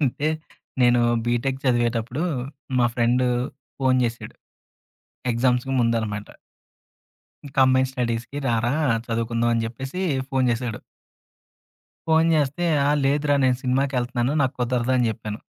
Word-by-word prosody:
అంటే, 145 +2 0 0.5
నేను 120 0 +5 0.2
బీటెక్ 125 +3 -1
చదివేటప్పుడు, 120 +2 0 0.6
మా 120 - +4
ఫ్రెండు 120 +1 +2 0.5
ఫోన్ 130 -1 +3
చేసాడు. 115 0 -4 1.0
ఎగ్జామ్స్‌కి 125 +2 +1
ముందు 115 0 +2
అన్నమాట. 105 -2 -4 1.3
"కంబైన్ 130 0 +4
స్టడీస్‌కి 120 +1 -3
రారా! 120 +3 +1 0.3
చదువుకుందాం" 115 0 0
అని 115 - 0
చెప్పేసి, 135 +9 -6 0.3
ఫోన్ 130 -1 +1
చేసాడు. 115 -2 -3 1.3
ఫోన్ 160 0 +4
చేస్తే, 145 +4 0 0.2
"ఆ! - - +3
లేదురా 145 +1 +2
నేను 130 -1 +3
సినిమాకెళ్తున్నాను, 130 -1 0
నాకు 130 0 0
కుదరదు" 125 0 0
అని 120 -2 +2
చెప్పాను. 110 -1 -6
125 Hz, 110 wpm, -23 LUFS, 115-135 Hz, 1.3 s, నేను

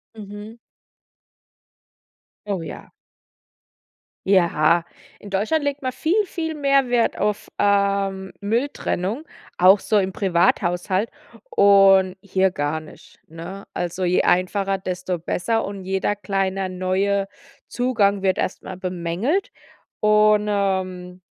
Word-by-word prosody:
Mhm. 210 +1 -9 1.9
Oh, 195 -4 -2
ja. 160 - -9 1.4
Ja, 170 -3 +3 0.3
in 205 - -11
Deutschland 220 +11 0
legt 285 0 -2
man 255 -1 -2
viel, 345 - +1
viel 320 -3 -4
mehr 275 -3 +2
Wert 240 -1 +1
auf, 210 -1 -2
ähm, 200 -1 +1
Mülltrennung, 225 - -2 0.3
auch 190 +3 +6
so 215 - +1
im 190 -1 0
Privathaushalt, 185 +2 +1 0.4
und 195 -2 +5
hier 190 -1 +1
gar 145 -2 -2
nicht, 155 - -16
ne? 170 +5 -9
Also, 180 +1 -3
je 180 +1 +3
einfacher, 195 +2 +1
desto 185 -1 -4
besser 225 +7 -1
und 200 -1 -7
jeder 190 +2 -1
kleine 195 -1 -2
neue 190 +2 0 0.4
Zugang 210 -6 +1
wird 190 -1 +1
erstmal 185 0 -4
bemängelt, 185 - -2 0.5
und, 210 0 +4
ähm, 185 -2 -2
195 Hz, 110 wpm, -22 LUFS, 185-210 Hz, 1.9 s, auch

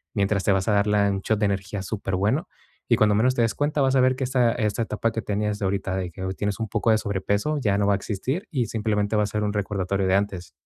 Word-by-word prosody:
mientras 100 -1 +1
te - - +2
vas 95 -1 +1
a 110 - +3
dar 100 +1 +2
la 105 -1 +3
un 95 0 -2
shot 110 0 0
de 105 - +2
energía 100 0 -2
superbueno, 100 0 -1 0.4
y - - +4
cuando 105 -1 +4
menos 125 +5 +3
te - - +1
des 115 -3 +1
cuenta, 145 0 0
vas 135 0 +2
a - - +4
ver 130 0 +3
que 130 - -3
esta 125 -2 +2
esta 110 -1 -1
etapa 110 +1 -1
que 115 - -3
tenías 105 0 -1
de 100 - -2
ahorita 95 -1 -1
de 90 -2 -3
que 95 - -10
hpy 95 0 -3
tienes 105 +1 -2
un 115 - -2
poco 115 +2 +1
de 110 - +4
sobrepeso, 100 +8 -1
ya 100 -6 +1
no 100 - +2
va 100 - +4
a - - +3
existir 130 - -3
y, 125 -7 0
simplemente, 105 -1 -1
va 105 - +3
a - - +1
ser 105 0 -2
un 105 -1 -1
recordatorio 100 -1 -1
de 95 - +2
antes. 95 -3 -2
105 Hz, 280 wpm, -24 LUFS, 100-115 Hz, 0.4 s, y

